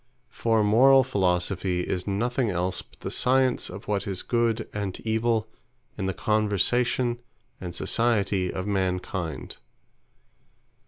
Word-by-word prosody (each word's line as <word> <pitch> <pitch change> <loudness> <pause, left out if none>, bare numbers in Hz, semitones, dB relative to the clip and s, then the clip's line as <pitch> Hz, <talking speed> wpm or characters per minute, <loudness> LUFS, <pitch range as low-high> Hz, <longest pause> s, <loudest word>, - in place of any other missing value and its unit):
For 115 -2 +1
Morall 130 +6 +6
Philosophy 90 -4 0
is 90 +1 -3
nothing 120 +4 0
else 90 0 -1
but - - -23
the - - -4
Science 130 0 +2
of 95 +3 -9
what 105 -1 -1
is 95 -2 -3
Good, 115 -2 0
and 100 -3 -4
Evill, 110 0 +1 0.5
in 95 - -3
the 95 - -1
conversation, 120 +3 +1 0.4
and 90 -2 -6
Society 100 -4 0
of 95 - -4
mankind. 90 -7 -2
105 Hz, 120 wpm, -26 LUFS, 95-120 Hz, 0.5 s, Morall